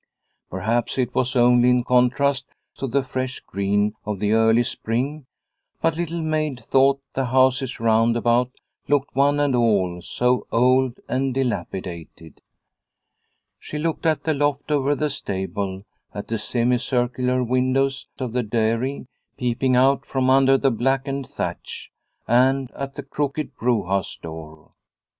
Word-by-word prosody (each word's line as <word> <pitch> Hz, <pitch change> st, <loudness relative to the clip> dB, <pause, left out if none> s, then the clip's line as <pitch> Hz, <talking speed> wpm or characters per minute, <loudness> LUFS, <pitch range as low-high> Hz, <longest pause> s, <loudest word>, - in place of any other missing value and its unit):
Perhaps 110 Hz, +8 st, -1 dB
it 130 Hz, -2 st, 0 dB
was 130 Hz, +1 st, 0 dB
only 125 Hz, 0 st, +5 dB
in 125 Hz, 0 st, +3 dB
contrast 130 Hz, +3 st, +2 dB, 0.3 s
to 135 Hz, -, -3 dB
the 135 Hz, +2 st, 0 dB
fresh 130 Hz, 0 st, -4 dB
green 100 Hz, +2 st, 0 dB
of 105 Hz, -2 st, -4 dB
the 105 Hz, +1 st, 0 dB
early 110 Hz, +1 st, +4 dB
spring, 130 Hz, +6 st, -3 dB, 0.5 s
but 165 Hz, -1 st, +1 dB
Little 170 Hz, 0 st, -3 dB
Maid 155 Hz, -4 st, -1 dB
thought 135 Hz, +2 st, +3 dB
the 135 Hz, -, -1 dB
houses 130 Hz, +1 st, +2 dB
round 115 Hz, +1 st, +3 dB
about 120 Hz, +1 st, +2 dB, 0.4 s
looked 140 Hz, 0 st, 0 dB
one 140 Hz, +2 st, +3 dB
and 145 Hz, -3 st, +2 dB
all 100 Hz, -7 st, +1 dB
so 125 Hz, +5 st, 0 dB
old 130 Hz, +1 st, +2 dB
and 130 Hz, +1 st, -1 dB
dilapidated. 90 Hz, -, -4 dB, 1.2 s
She 150 Hz, -, -7 dB
looked 165 Hz, +1 st, -1 dB
at 155 Hz, -1 st, +1 dB
the 160 Hz, -, +1 dB
loft 145 Hz, 0 st, -1 dB
over 145 Hz, 0 st, +2 dB
the 150 Hz, 0 st, -1 dB
stable, 95 Hz, -4 st, -4 dB, 0.3 s
at 100 Hz, -, -6 dB
the 115 Hz, -1 st, -1 dB
semicircular 125 Hz, +2 st, 0 dB
windows 130 Hz, +2 st, 0 dB
of 125 Hz, -4 st, -4 dB
the 125 Hz, -, +1 dB
dairy 115 Hz, +4 st, -1 dB, 0.3 s
peeping 125 Hz, +1 st, 0 dB
out 135 Hz, +2 st, +3 dB
from 130 Hz, -1 st, +1 dB
under 135 Hz, 0 st, +5 dB
the 135 Hz, 0 st, +2 dB
blackened 135 Hz, +2 st, -1 dB
thatch, -, -, -6 dB, 0.4 s
and 130 Hz, +2 st, +3 dB
at 140 Hz, 0 st, -6 dB
the -, -, -6 dB
crooked 145 Hz, 0 st, -3 dB
brewhouse 100 Hz, -6 st, -1 dB
door. 80 Hz, -1 st, -10 dB
125 Hz, 140 wpm, -22 LUFS, 115-135 Hz, 1.2 s, only